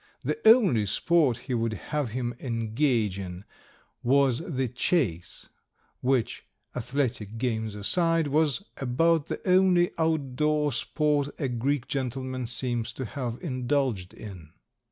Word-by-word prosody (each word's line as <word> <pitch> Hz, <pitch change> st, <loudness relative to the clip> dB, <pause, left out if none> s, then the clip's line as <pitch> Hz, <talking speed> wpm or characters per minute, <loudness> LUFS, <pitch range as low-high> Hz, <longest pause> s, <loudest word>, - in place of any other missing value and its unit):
The -, -, -1 dB
only 190 Hz, -, +5 dB
sport 145 Hz, -, +2 dB
he 125 Hz, +1 st, -5 dB
would 115 Hz, -1 st, 0 dB
have 145 Hz, -, -3 dB
him 120 Hz, +1 st, -3 dB
engage 115 Hz, -3 st, 0 dB
in 90 Hz, 0 st, -7 dB, 0.6 s
was 135 Hz, 0 st, +3 dB
the 145 Hz, -7 st, -2 dB
chase, 120 Hz, -, -1 dB, 0.5 s
which, 130 Hz, -2 st, 0 dB, 0.3 s
athletic 120 Hz, -4 st, -2 dB
games 110 Hz, -3 st, -2 dB
aside, 165 Hz, -, +2 dB
was 155 Hz, +4 st, +1 dB
about 145 Hz, +5 st, +2 dB
the -, -, -5 dB
only 180 Hz, -1 st, +4 dB
outdoor 150 Hz, -1 st, +1 dB
sport 145 Hz, +2 st, 0 dB
a 140 Hz, -, -1 dB
Greek 130 Hz, +2 st, -1 dB
gentleman 130 Hz, -1 st, -3 dB
seems 120 Hz, -1 st, -2 dB
to 130 Hz, -, -5 dB
have 120 Hz, 0 st, -4 dB
indulged 130 Hz, -, -1 dB
in. 90 Hz, -7 st, -10 dB
130 Hz, 120 wpm, -27 LUFS, 115-150 Hz, 0.6 s, only